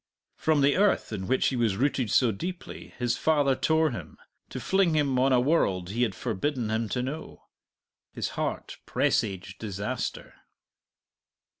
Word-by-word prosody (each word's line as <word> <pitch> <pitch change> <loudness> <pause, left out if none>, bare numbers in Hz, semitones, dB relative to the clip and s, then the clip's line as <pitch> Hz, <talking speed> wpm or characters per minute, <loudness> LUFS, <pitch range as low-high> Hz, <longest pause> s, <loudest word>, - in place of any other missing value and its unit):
From 155 -2 +2
the 140 +3 +4
earth 200 - +2
in 95 -3 -4
which 130 - +2
he 130 - -3
was 115 -5 +1
rooted 130 -3 +1
so 120 +2 +4
deeply 175 - -7
his 120 -1 0
father 145 -4 +3
tore 160 +1 +2
him, 120 - -8 0.3
to - - -5
fling 190 -4 +2
him 140 -4 +2
on 135 +1 +3
a 125 - +5
world 100 - +1
he 115 +4 -2
had 110 -6 +1
forbidden 120 +1 -2
him 110 0 -1
to 125 - -1
know. 145 +5 -6 0.7
His - - -3
heart - - -4
presaged 95 -3 0
disaster. 100 -2 -4
125 Hz, 155 wpm, -27 LUFS, 110-150 Hz, 0.7 s, a